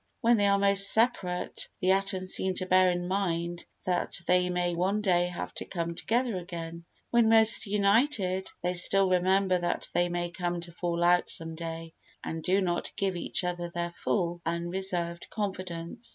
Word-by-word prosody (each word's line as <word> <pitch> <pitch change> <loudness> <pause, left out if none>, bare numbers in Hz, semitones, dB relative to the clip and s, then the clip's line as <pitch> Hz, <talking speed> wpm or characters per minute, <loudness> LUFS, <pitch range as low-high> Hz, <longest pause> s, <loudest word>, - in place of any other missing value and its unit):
When 235 0 +3
they 205 -1 +2
are 200 0 +3
most 200 0 +6
separate, 215 -6 0
the 185 -1 +2
atoms 190 -1 +1
seem 190 -1 +2
to 185 - -3
bear 185 0 +4
in 175 0 -2
mind 175 -3 -2 0.2
that 180 0 -1
they 180 0 +2
may 175 -1 -1
one 190 +5 -1
day 175 -3 +2
have 180 - -6
to - - -6
come 170 -2 -4
together 235 +4 -1
again; 170 -2 -8 0.3
when 235 -2 +3
most 225 -1 +5
united, 200 -1 +1
they 180 0 0
still 190 +1 +4
remember 185 +1 +2
that 175 - -1
they 175 0 +1
may 175 0 -3
come 175 -1 -3
to 170 0 -7
fall 170 0 -3
out 175 +1 +3
some 165 0 +2
day 165 0 -7 0.3
and 160 0 -5
do 190 +5 +1
not 175 -2 -2
give 195 -2 -2
each 175 - -2
other 175 -1 -3
their 170 0 -4
full, 175 -1 -2
unreserved 170 0 -2
confidence. 185 +1 -5
180 Hz, 175 wpm, -28 LUFS, 175-195 Hz, 0.3 s, most